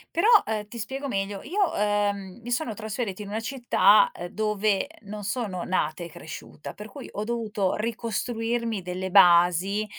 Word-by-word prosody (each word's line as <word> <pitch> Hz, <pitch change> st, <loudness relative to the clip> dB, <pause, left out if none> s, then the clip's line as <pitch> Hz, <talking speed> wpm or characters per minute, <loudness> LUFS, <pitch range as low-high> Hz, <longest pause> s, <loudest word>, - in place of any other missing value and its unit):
Però, 335 Hz, +6 st, +3 dB, 0.2 s
ehm, 210 Hz, -1 st, -3 dB
ti 235 Hz, -, -8 dB
spiego 270 Hz, +5 st, -4 dB
meglio. 195 Hz, -3 st, -3 dB
Io, 385 Hz, +6 st, 0 dB
ehm, 205 Hz, -1 st, 0 dB
mi 240 Hz, -, -8 dB
sono 240 Hz, -2 st, -1 dB
trasferita 215 Hz, -1 st, -4 dB
in 205 Hz, -, -7 dB
una 215 Hz, +2 st, -3 dB
città, 265 Hz, -, +4 dB
ehm, -, -, -6 dB
dove 210 Hz, +1 st, 0 dB
non 205 Hz, -1 st, -7 dB
sono 205 Hz, -4 st, -2 dB
nata 170 Hz, -2 st, -1 dB
e -, -, -9 dB
cresciuta, 155 Hz, -1 st, -9 dB
per 210 Hz, -, -9 dB
cui 205 Hz, -, -10 dB
ho 210 Hz, -, -4 dB
dovuto 215 Hz, -4 st, -1 dB
ricostruirmi 230 Hz, 0 st, -2 dB
delle 180 Hz, +1 st, -4 dB
basi, 180 Hz, +2 st, +5 dB
210 Hz, 160 wpm, -26 LUFS, 195-230 Hz, 0.2 s, basi